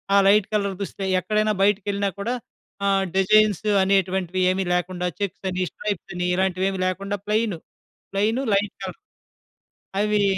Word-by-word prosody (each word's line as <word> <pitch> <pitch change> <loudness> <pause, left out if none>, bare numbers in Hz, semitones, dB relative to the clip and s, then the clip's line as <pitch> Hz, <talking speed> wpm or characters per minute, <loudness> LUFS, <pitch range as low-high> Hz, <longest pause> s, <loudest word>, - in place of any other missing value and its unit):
ఆ - - +7
light 205 0 +5
colour 200 -2 0
దుస్తులే, 195 0 -4
ఎక్కడైనా 215 +3 +1
బయటకెళ్ళినా 200 0 +1
కూడా 230 +5 -1 0.5
ఆహ్, 195 -1 +3
డిజైన్స్ 215 +2 +4 0.2
అనేటువంటివి 190 -1 +1
ఏమీ 190 0 -1
లేకుండా 180 0 -1
చెక్సని, 190 -2 -2
స్ట్రైప్స‌ని, 180 -3 -3
ఇలాంటివేవీ 190 0 0
లేకుండా 195 +2 -2
ప్లెయిను. 210 -5 0 0.5
Plain 220 +7 +1
light 200 +1 0
colour. - - -6 1.0
అవీ 210 -1 +2
195 Hz, 120 wpm, -23 LUFS, 185-210 Hz, 1.0 s, ఆ